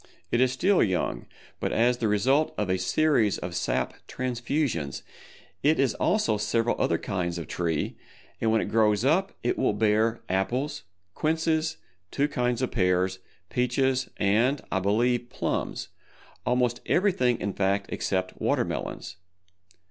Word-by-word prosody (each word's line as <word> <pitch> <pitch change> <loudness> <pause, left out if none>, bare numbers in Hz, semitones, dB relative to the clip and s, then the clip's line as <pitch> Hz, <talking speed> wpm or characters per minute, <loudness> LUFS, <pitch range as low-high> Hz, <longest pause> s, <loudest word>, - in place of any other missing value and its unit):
It 120 - +2
is 130 -1 +4
still 185 +9 +3
young, 95 -4 0 0.3
but - - -1
as 120 +2 +2
the 115 - +1
result 130 +9 +2
of 100 -3 0
a 95 - +1
series 110 +2 +2
of 90 0 -5
sap 85 - -1
transfusions 120 - -2 0.6
it 150 +1 +3
is 135 -4 +3
also 115 - +1
several 115 +3 +1
other - - +2
kinds 90 -3 -3
of 85 - -5
tree, 85 -3 -2 0.4
and 110 - +2
when 110 - +3
it - - -2
grows 110 0 +3
up 185 +7 +2
it 120 - 0
will - - +2
bear 110 +2 +2
apples, 120 +11 -1 0.3
quinces, 160 - 0 0.3
two 145 +1 +1
kinds 125 -3 -1
of 130 - -1
pears, 95 -2 +1 0.3
peaches 130 +1 +1
and, 115 +8 +2
I 95 - +1
believe, 120 +5 +1
plums—almost 125 -1 -3
everything 150 - +2
in 100 - -2
fact 100 0 +1
except 95 -1 -2
Water - - +2
Melons. 90 +1 -5
115 Hz, 140 wpm, -27 LUFS, 100-130 Hz, 0.6 s, is